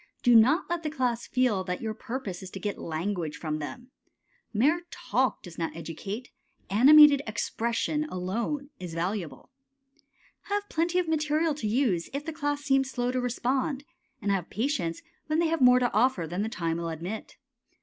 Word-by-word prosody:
Do 245 -1 +6
not 260 +10 +5
let 345 0 -2
the 310 - -2
class 250 -5 -1
feel 245 -7 +1
that 180 -1 -3
your 220 -1 -3
purpose 220 -5 -5
is 190 - -8
to 195 - -8
get 205 +2 -3
language 165 0 -3
from 155 -2 -3
them. 200 - -7 0.6
Mere 290 +11 +2
talk 255 +4 -1
does 175 -2 -10
not 165 -1 -2
educate. 195 +9 -6 0.4
Animated 285 +6 +8
expression 235 +7 -1
alone 235 +8 -3
is 175 -3 -6
valuable. 170 - -4 0.9
Have 410 0 -2
plenty 335 +2 0
of 360 -2 +1
material 310 0 +1
to 285 -7 -4
use 210 -7 +1
if 285 +1 -3
the 325 - -4
class 290 -1 -2
seem 270 -1 +3
slow 250 -2 -2
to 255 0 -1
respond, 260 +3 -1 0.4
and 200 - +1
have 190 -3 -1
patience 205 - -2 0.2
when 310 0 +1
they 335 -1 +2
have 330 -2 0
more 250 0 +7
to 245 -1 +1
offer 220 -5 +2
than 175 +5 -3
the 220 - -1
time 165 -5 -2
will 170 0 -3
admit. 175 +7 -6
240 Hz, 175 wpm, -28 LUFS, 185-290 Hz, 0.9 s, Animated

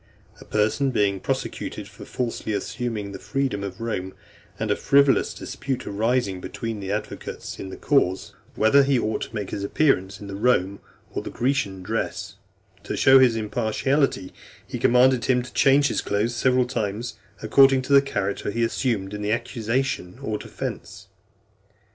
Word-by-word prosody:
A - - -13
person 110 +6 +1
being 100 -5 +1
prosecuted - - -4
for - - -12
falsely 115 -3 -3
assuming 105 0 -3
the 100 - -8
freedom 135 -8 -2
of 95 -1 -6
Rome, 95 -5 -4 0.4
and - - -1
a - - +3
frivolous 140 -1 +3
dispute 135 -2 -5
arising 105 -2 0
between 115 +2 -5
the 95 -1 -4
advocates 105 +1 -5
in 95 - -6
the - - -8
cause, 95 -10 +1 0.2
whether 110 +6 +5
he 135 -1 +2
ought 110 -2 -1
to 115 - -6
make 105 -3 -4
his 100 - -4
appearance 100 -6 +1
in 105 - -9
the 100 - -7
Roman 100 -3 +1 0.3
or - - -3
Grecian 110 -8 -1
dress, 100 -1 -3 0.5
to - - -4
show 135 0 +7
his 125 -3 +5
impartiality, 115 +2 0 0.3
he - - -6
commanded 125 0 +4
him 125 -1 +2
to 125 - -11
change 140 +1 +4
his - - -1
clothes 105 +4 0
several 125 0 +3
times 110 0 -3 0.2
according 135 +4 +5
to 140 - -1
the 140 - +8
character 100 -9 -2
he 115 +3 -1
assumed 115 -4 -1
in 105 - -5
the 105 0 -1
accusation 115 -3 -2
or 110 -5 -2
defence. - - -7
115 Hz, 160 wpm, -24 LUFS, 100-130 Hz, 0.5 s, the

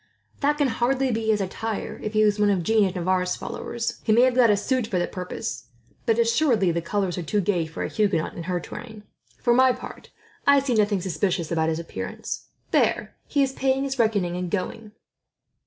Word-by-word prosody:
"That 295 +1 +2
can 290 -3 +2
hardly 255 +3 +1
be 225 -1 -2
his 215 -2 +2
attire, 215 +3 -4
if 215 - -4
he 215 0 +4
is 210 -1 +2
one 210 0 +4
of 190 -4 +1
Jeanne 220 +2 +3
of 190 0 -2
Navarre's 180 0 0
followers. 235 -1 -4
He 220 - +1
may 230 +3 +6
have 255 0 +4
got 245 -2 +5
a 205 - +4
suit 255 +2 0
for 190 - -1
the 175 - +1
purpose, 180 -9 -5 0.4
but 225 -1 +3
assuredly 230 - +3
the 170 0 -1
colours 185 0 -1
are - - -2
too 175 +6 0
gay 175 -4 0
for 160 - -5
a - - -1
Huguenot 200 -7 0
in - - -7
her 180 -1 0
train. 220 +3 -9 0.3
For 240 - +2
my 260 +1 +5
part, - - -10 0.4
I 280 0 +7
see 270 -2 -1
nothing 205 -3 +2
suspicious 175 -1 -1
about 160 -1 +1
his 160 - -1
appearance. 165 0 -6 0.2
There, - - +1
he 285 - +2
is 265 -1 -1
paying 270 0 +1
his 270 -1 -3
reckoning, 205 -6 +1
and 180 0 -3
going." 210 +3 -4
210 Hz, 210 wpm, -24 LUFS, 180-240 Hz, 0.4 s, I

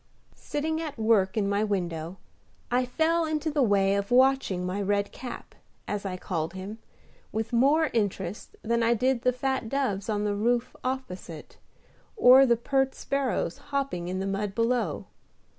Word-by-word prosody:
Sitting 315 +2 -3
at 305 -4 -5
work 220 -3 +2
in 205 -2 +1
my 200 +1 +1
window, 175 -4 -3 0.5
I 250 +1 +2
fell 330 +5 +1
into 315 0 -1
the 295 -1 +1
way 200 -4 +3
of 200 0 -1
watching 255 -8 +3
my 185 +3 -2
Red 200 0 0
Cap, 250 -2 -8 0.3
as 205 -1 -3
I 185 -1 -4
called 165 -2 -3
him, 195 +4 -7 0.5
with 220 +2 -3
more 290 +6 +3
interest 200 -3 -2
than 235 +1 +1
I 230 +1 +3
did 255 +1 +1
the 250 - +3
fat 260 -2 -2
doves 225 -7 -1
on 210 -1 0
the 205 -1 0
roof 235 +4 0
opposite, 190 - -6 0.6
or 265 -5 +8
the 235 -1 +4
pert 270 +2 0
sparrows 265 -11 -2
hopping 275 -11 -2
in 185 +1 -3
the 190 - -2
mud 195 0 -2
below. 230 -8 0
225 Hz, 160 wpm, -27 LUFS, 195-265 Hz, 0.6 s, or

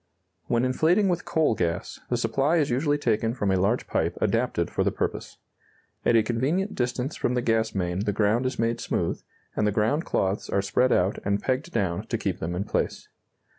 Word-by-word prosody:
When 120 +1 +2
inflating 170 +10 +3
with 175 -1 -1
coal 160 -6 +2
gas, 90 -3 -2
the 120 - +1
supply 140 +7 +1
is 145 -5 +1
usually 145 +4 +1
taken 115 -3 0
from 100 -6 0
a - - +3
large 105 +6 +1
pipe - - -1
adapted - - 0
for - - 0
the - - +2
purpose. - - -4 0.7
At 120 - +3
a 115 - +5
convenient 145 - 0
distance 125 +3 -2
from 125 - -1
the 125 - +1
gas 110 -2 +1
main 90 -1 -1
the 105 +1 0
ground 110 +5 +2
is 130 - -4
made 115 0 0
smooth, - - -1 0.3
and 105 - +1
the - - +2
ground 110 +10 +1
cloths 95 - -1
are 100 - +1
spread 125 +6 +2
out 95 +3 +2
and 100 +1 +1
pegged 130 +6 -2
down 90 - -1
to - - -1
keep - - -2
them 85 +2 -3
in 90 - -1
place. - - -2
115 Hz, 205 wpm, -26 LUFS, 100-135 Hz, 0.7 s, a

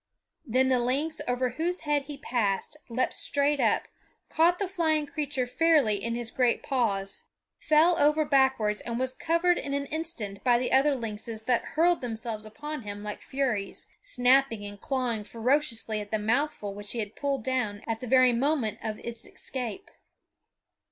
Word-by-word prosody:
Then 260 +3 +3
the 255 -1 +3
lynx 275 +6 -1
over 250 +1 +1
whose 345 +6 -2
head 295 -2 0
he 290 -1 -7
passed 235 -5 -1
leaped 250 +2 0
straight 285 0 +1
up, - - +2 0.4
caught 340 +2 +3
the 400 - -1
flying 320 -5 +1
creature 290 -3 -2
fairly 260 -7 +3
in 230 0 -1
his 235 -1 -4
great 250 -2 +1
paws, 200 -7 -1 0.3
fell 320 +3 +4
over 300 +1 +4
backwards, 265 -7 +2
and 235 -1 -4
was 260 +1 -1
covered 335 +5 +2
in 280 0 -3
an 280 0 -1
instant 280 - -5
by 245 -2 +5
the 250 +1 -1
other 275 +2 +4
lynxes 220 -1 -5
that 245 0 +1
hurled 345 +2 +4
themselves 225 -2 -4
upon 295 +7 -6
him 205 -1 -7
like 210 0 -5
furies, 245 -8 -2 0.2
snapping 250 - +2
and 205 -1 -9
clawing 250 -5 -1
ferociously 230 -2 0
at 205 - -8
the 220 - 0
mouthful 220 -1 -1
which 205 0 -7
he 240 - -3
had 210 -1 -4
pulled 275 -4 -1
down 240 -6 -1
at 225 -1 -2
the 250 - -6
very 255 0 +5
moment 240 -4 0
of 215 -1 -3
its 235 0 -6
escape. 260 - -6
255 Hz, 170 wpm, -28 LUFS, 220-290 Hz, 0.4 s, by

